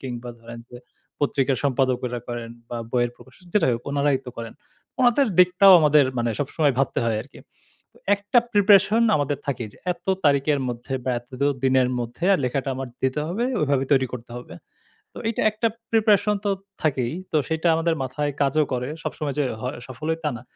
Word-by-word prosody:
কিংবা 125 -2 -6
ধরেন 115 0 -10
যে, 120 - -11 0.4
পত্রিকার 135 -2 +1
সম্পাদকরা 125 -2 0
করেন 120 -1 -5 0.2
বা 120 - -5 0.2
বইয়ের 120 -1 +1
প্রকাশক 130 +8 -18
যেটাই 160 -11 +3
হোক 115 - -6
উনারাই 140 -1 +2
তো - - -5
করেন 115 -1 -6 0.5
উনাদের 250 +2 +4
দিকটাও 180 +2 +7
আমাদের 150 -2 +5
মানে 120 0 0
সবসময় 145 0 +1
ভাবতে 135 - +1
হয় 115 -2 +1
আরকি। - - -16 0.5
তো - - -27 0.2
একটা 205 +4 +1
প্রিপারেশন 205 +1 +5
আমাদের 145 -1 -1
থাকে 125 -4 -2
যে, - - -19 0.2
এত - - -20 0.2
তারিখের 145 0 +3
মধ্যে 120 +2 -6
বা 130 - 0
এত 120 +1 -21
দো 140 - +3 0.2
দিনের 130 -1 +3
মধ্যে 120 +6 -5
আর - - +3
লেখাটা 135 +2 -1
আমার 130 0 -5
দিতে 130 +3 0
হবে 220 +8 -1 0.2
ওইভাবে 140 -3 +1
তৈরি 130 -2 +3
করতে 120 -1 -8
হবে। 105 -9 -11 0.6
তো - - -10
এইটা 230 - -1
একটা 220 +2 0 0.2
প্রিপারেশন 210 -2 +3
তো 205 - +1 0.3
থাকেই, 130 -5 0 0.2
তো - - +2
সেইটা 160 +1 0
আমাদের 165 0 +1
মাথায় 135 +3 -2
কাজও 145 +2 +2
করে। 125 0 -2
সবসময় 145 -3 -4
যে 145 - +2 0.2
হ - - -10 0.2
সফল 130 +3 -8
হই 160 - -1
তা 150 - +2
না। 120 - -11
140 Hz, 185 wpm, -23 LUFS, 125-165 Hz, 0.6 s, দিকটাও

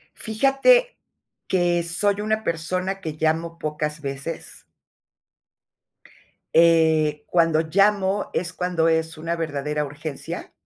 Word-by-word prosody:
Fíjate 275 - +3 0.5
que, 175 -2 +1
soy 200 +4 0
una 215 +1 -1
persona 185 +3 -2
que 155 -3 -6
llamo 165 +1 -1
pocas 150 0 -3
veces 140 +3 -6 1.9
eh, 160 -2 +4
cuando 165 -2 +3
llamo 195 +3 +1
es 180 +1 -2
cuando 180 -2 0
es 160 0 0
una 165 +2 -3
verdadera 150 -2 -2
urgencia. 145 +1 -7
165 Hz, 100 wpm, -23 LUFS, 155-190 Hz, 1.9 s, eh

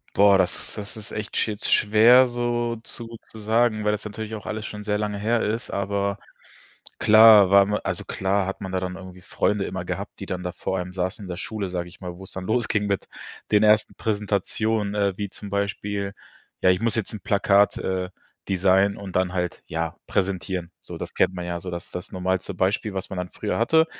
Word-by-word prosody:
Boah, 100 -1 +6
das 90 -1 -1
das 105 +2 -6
ist 105 - -8
echt 105 -2 -5
jetzt 105 -1 -3
schwer 115 +5 +6
so 120 -1 -1
zu 115 0 -8
zu 110 - -11
sagen, 110 0 +2
weil 105 - +2
das 105 0 -3
natürlich 110 +1 -6
auch 105 - -9
alles 110 0 -4
schon 105 0 -7
sehr 105 0 0
lange 105 -1 -2
her 115 +3 +1
ist, 110 +3 -2
aber 100 0 -1 0.8
klar 110 -3 +8
war 100 0 +7
ma 105 +1 0
also, - - -3
klar 95 0 0
hat 95 +3 -5
man 95 -2 -5
da 95 - 0
dann 90 0 -4
irgendwie 95 -1 -11
Freunde 100 +2 0
immer 95 -2 -4
gehabt, - - -5
die - - -5
dann 90 0 -4
da 90 - -3
vor 95 -1 -2
einem 90 0 -5
saßen 95 +2 -3
in 95 - -8
der 85 - -4
Schule, 100 -1 -4
sage 90 -1 -4
ich 90 - -17
mal, 90 -1 -6
wo 95 - -11
es - - -10
dann 95 -1 -6
losging 105 -2 0
mit 100 -1 -1 0.4
den 105 0 +5
ersten 105 0 +4
Präsentationen, 105 0 -1
äh, 100 -1 +1
wie 100 -2 -3
zum 100 0 -9
Beispiel, 100 0 -2 0.5
ja, 95 - +5
ich 90 0 +3
muss 115 0 +1
jetzt 110 -1 -2
'n 105 - -5
Plakat, 100 0 +3
äh, 95 -1 -2 0.4
designen 95 +1 +3
und 95 -3 -8
dann 95 -1 +1
halt, 90 -1 -2
ja, 80 0 -3
präsentieren. 95 -2 -2
So, - - -9
das - - -6
kennt - - +2
man 90 -1 -5
ja 85 0 -3
so, 90 - -7
das 85 0 -5
ist - - -13
das 90 - -6
normalste 95 +1 -1
Beispiel, 95 +3 0
was 95 0 -4
man 95 - -5
dann 90 0 -2
früher 105 +4 -3
hatte. 160 +7 +4
100 Hz, 220 wpm, -24 LUFS, 95-105 Hz, 0.8 s, klar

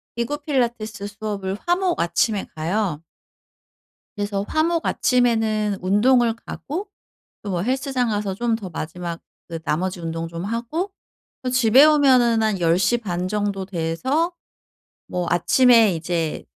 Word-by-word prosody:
기구 235 +6 -2
필라테스 235 -8 -2
수업을 205 -2 -4
화, 350 0 +3
목 365 -2 -1
아침에 200 +4 +1
가요. 170 0 -1 1.1
그래서 205 -1 -2
화, 310 0 +1
목 335 -1 0
아침에는 220 -5 +1
운동을 230 +5 +3
가고 335 - -6 0.6
또 185 -3 -2
헬스장 260 -1 0
가서 205 -2 -1
좀 235 +1 0
더 200 -5 -7
마지막 170 +1 -6 0.3
그 165 -2 -5
나머지 180 +4 -1
운동 165 0 -4
좀 170 +1 -6
하고 240 - -3 0.5
어 255 - -1
집에 250 +3 +6
오면은 255 -7 +4
한 210 -4 0
10 165 0 +3
시 195 +6 +2
반 180 -4 -3
정도 205 -1 -2
돼서 200 - -1 0.7
뭐 180 -1 -2
아침에 225 +3 +5
이제 165 -1 -2
215 Hz, 250 characters per minute, -22 LUFS, 180-250 Hz, 1.1 s, 집에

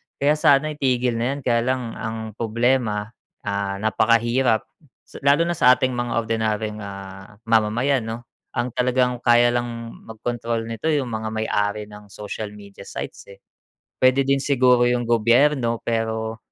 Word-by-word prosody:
kaya 150 +2 +1
sana 145 +1 +4
itigil 125 -5 0
na 125 +4 0
yan. - - -6
Kaya 120 -1 +1
lang, 130 -3 -1
ang 110 0 -4
problema, 115 -1 0 0.3
ah, 100 -1 -2
napakahirap 115 +3 +2 0.4
sa - - -12
lalo 140 +4 +4
na 170 - -1
sa 125 -7 +5
ating 130 0 0
mga 120 -1 -2
ordinaryong, 110 -2 -1
ah, 100 0 -9
mamamayan 115 +3 +1
'no, 115 +1 -5 0.3
ang 125 +1 -1
talagang, 125 0 +1
kaya 120 0 +4
lang 120 0 -1 0.4
magkontrol 115 +1 -3
nito 115 +7 -5
yung 140 -6 0
mga 110 0 -3
may-ari 105 -1 -1
ng 105 0 -12
social 105 +1 -7
media 100 -1 -13
sites, - - -7
eh. 100 0 -15 0.5
Puwede 130 +1 +4
din 135 0 +2
siguro 125 -3 +3
yung 120 -1 0
gobyerno 120 +1 +3
pero, 110 -1 -2
115 Hz, 150 wpm, -22 LUFS, 110-125 Hz, 0.5 s, sa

